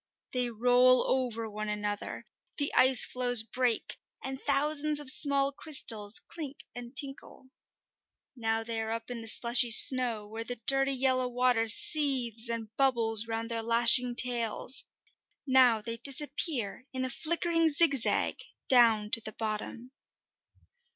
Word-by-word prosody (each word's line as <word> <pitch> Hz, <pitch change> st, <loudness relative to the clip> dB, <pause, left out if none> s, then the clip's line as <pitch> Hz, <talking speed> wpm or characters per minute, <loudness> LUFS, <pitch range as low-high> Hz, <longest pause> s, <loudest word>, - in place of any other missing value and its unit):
They 250 Hz, -1 st, -3 dB
roll 245 Hz, +2 st, +2 dB
over 240 Hz, -4 st, -3 dB
one 215 Hz, 0 st, -8 dB
another, 205 Hz, 0 st, -6 dB, 0.3 s
the 285 Hz, -1 st, -1 dB
ice 260 Hz, -1 st, +2 dB
floes 245 Hz, -2 st, +3 dB
break, 245 Hz, 0 st, -4 dB, 0.3 s
and 265 Hz, 0 st, -8 dB
thousands 300 Hz, +1 st, -1 dB
of 285 Hz, -3 st, +6 dB
small 280 Hz, 0 st, +3 dB
crystals 225 Hz, -8 st, -1 dB
clink 295 Hz, -4 st, -10 dB
and 245 Hz, +1 st, -12 dB
tinkle. 270 Hz, -1 st, -3 dB, 0.8 s
Now 225 Hz, -2 st, -4 dB
they 225 Hz, 0 st, -6 dB
are 220 Hz, -, -6 dB
up 230 Hz, +2 st, -7 dB
in 235 Hz, -2 st, -8 dB
the 225 Hz, -, -9 dB
slushy 235 Hz, +2 st, +5 dB
snow, 230 Hz, -2 st, +5 dB
where 225 Hz, +2 st, -8 dB
the 245 Hz, +2 st, -7 dB
dirty, 270 Hz, 0 st, +1 dB
yellow 260 Hz, -1 st, -1 dB
water 245 Hz, -2 st, -1 dB
seethes 245 Hz, -3 st, +2 dB
and 225 Hz, -2 st, -7 dB
bubbles 230 Hz, -5 st, 0 dB
round 230 Hz, +1 st, -6 dB
their 230 Hz, -1 st, -4 dB
lashing 235 Hz, +2 st, +2 dB
tails; 240 Hz, 0 st, 0 dB, 0.6 s
now 255 Hz, -5 st, +2 dB
they 230 Hz, +2 st, -7 dB
disappear 270 Hz, -, -2 dB
in 260 Hz, -1 st, -5 dB
a -, -, -4 dB
flickering 330 Hz, +2 st, -2 dB
zigzag 285 Hz, -5 st, +3 dB, 0.3 s
down 225 Hz, -4 st, +2 dB
to 230 Hz, -, +5 dB
the 215 Hz, 0 st, -9 dB
bottom. 220 Hz, +3 st, -8 dB
245 Hz, 135 wpm, -27 LUFS, 225-265 Hz, 0.8 s, of